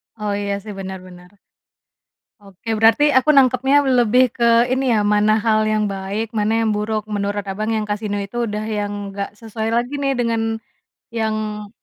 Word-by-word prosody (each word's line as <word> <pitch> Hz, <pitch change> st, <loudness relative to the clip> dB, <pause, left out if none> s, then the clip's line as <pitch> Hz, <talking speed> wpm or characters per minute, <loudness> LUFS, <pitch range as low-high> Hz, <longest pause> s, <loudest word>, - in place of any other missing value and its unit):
Oh, 210 Hz, -2 st, -3 dB
iya 200 Hz, 0 st, -2 dB
sih 210 Hz, -1 st, -7 dB
bener 190 Hz, 0 st, -6 dB
bener. 180 Hz, +2 st, -16 dB, 1.0 s
Oke, 200 Hz, +3 st, -5 dB
berarti 225 Hz, +7 st, +4 dB
aku 300 Hz, +4 st, +4 dB
nangkepnya 270 Hz, +1 st, +4 dB
lebih 250 Hz, -2 st, +3 dB
ke 235 Hz, +1 st, +3 dB
ini 260 Hz, -1 st, +1 dB
ya, 215 Hz, -, +2 dB
mana 210 Hz, +1 st, +2 dB
hal 215 Hz, 0 st, +2 dB
yang 215 Hz, -1 st, 0 dB
baik, 200 Hz, +3 st, -4 dB
mana 220 Hz, +2 st, +1 dB
yang 225 Hz, -, +1 dB
buruk 215 Hz, 0 st, -2 dB
menurut 205 Hz, 0 st, -2 dB
Abang, 215 Hz, +3 st, -2 dB
yang 220 Hz, -, 0 dB
kasino 205 Hz, 0 st, -3 dB
itu 235 Hz, +4 st, -3 dB
udah 210 Hz, -1 st, -3 dB, 0.2 s
yang 205 Hz, -1 st, -4 dB
nggak 200 Hz, +1 st, -5 dB
sesuai 220 Hz, +1 st, -4 dB
lagi 245 Hz, +5 st, -1 dB
nih 275 Hz, -1 st, 0 dB
dengan 230 Hz, -3 st, 0 dB, 0.7 s
yang 215 Hz, -2 st, -3 dB
215 Hz, 165 wpm, -20 LUFS, 205-235 Hz, 1.0 s, berarti